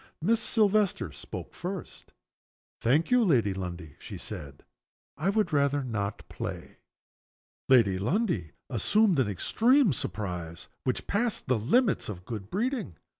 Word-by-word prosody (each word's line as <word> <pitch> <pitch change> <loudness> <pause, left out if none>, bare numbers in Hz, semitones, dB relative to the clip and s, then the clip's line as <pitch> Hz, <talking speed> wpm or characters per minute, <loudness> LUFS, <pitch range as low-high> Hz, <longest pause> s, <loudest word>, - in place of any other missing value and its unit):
Miss 220 +8 +2
Silvester 210 - +2
spoke - - -8
first. 180 +1 -7 0.7
"Thank 145 - +2
you, 250 -1 +5
Lady 120 - +3
Lundie," 90 -5 -6
she - - -8
said. 70 -1 -8 0.5
"I 165 +7 0
would 200 -4 +1
rather 140 -1 +2
not 105 -5 -3
play." - - -7 0.9
Lady 110 -8 +5
Lundie 170 - 0
assumed 180 - +3
an 130 - +3
extreme 230 - +3
surprise 90 -7 -5 0.2
which 130 - -1
passed 225 +1 0
the 125 -3 +1
limits 195 - +2
of 90 -3 -7
good 105 -4 -6
breeding. 220 - -2
140 Hz, 125 wpm, -28 LUFS, -, 0.9 s, you